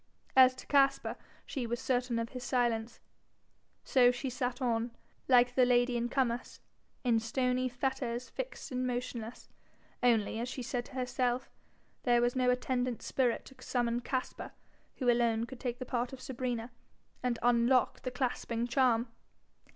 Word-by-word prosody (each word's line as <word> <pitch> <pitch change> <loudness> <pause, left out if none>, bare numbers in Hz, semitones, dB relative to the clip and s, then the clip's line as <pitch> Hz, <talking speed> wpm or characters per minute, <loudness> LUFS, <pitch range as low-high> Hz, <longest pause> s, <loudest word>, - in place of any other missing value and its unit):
As 255 -1 +7
to - - -11
Caspar, 275 -1 +3 0.3
she 255 -5 -3
was 240 +1 -2
certain 250 -2 0
of 230 0 -2
his 250 -1 -7
silence. 240 -3 0 0.8
So 250 -2 +5
she 250 +2 -2
sat 245 0 -2
on, 235 -2 0 0.4
like 245 -1 +5
the 255 - +4
lady 245 0 +3
in 240 0 -1
Comus, 245 -2 -1 0.4
'in 235 -3 +3
stony 250 +2 0
fetters 250 -1 -2
fixed - - -6
and 255 0 -1
motionless;' 245 -2 -4 0.5
only, 225 -3 +2
as 240 +2 -3
she 255 - -5
said 240 0 -3
to - - -14
herself, 250 0 -1 0.5
there 240 -1 +3
was 240 +1 +1
no 255 -1 +2
attendant 250 -1 0
spirit 250 -3 0
to 265 - -13
summon 240 -1 0
Caspar, 255 +1 -4 0.4
who 255 - -3
alone 235 -1 +3
could 260 0 -10
take 245 -2 -3
the 255 - -6
part 245 0 -2
of 265 - -7
Sabrina, 245 -2 -3 0.5
and 245 -2 0
'unlock 245 +1 +3
the 255 - -3
clasping 245 -2 -2
charm.' 245 -2 +3
245 Hz, 155 wpm, -32 LUFS, 240-255 Hz, 0.8 s, As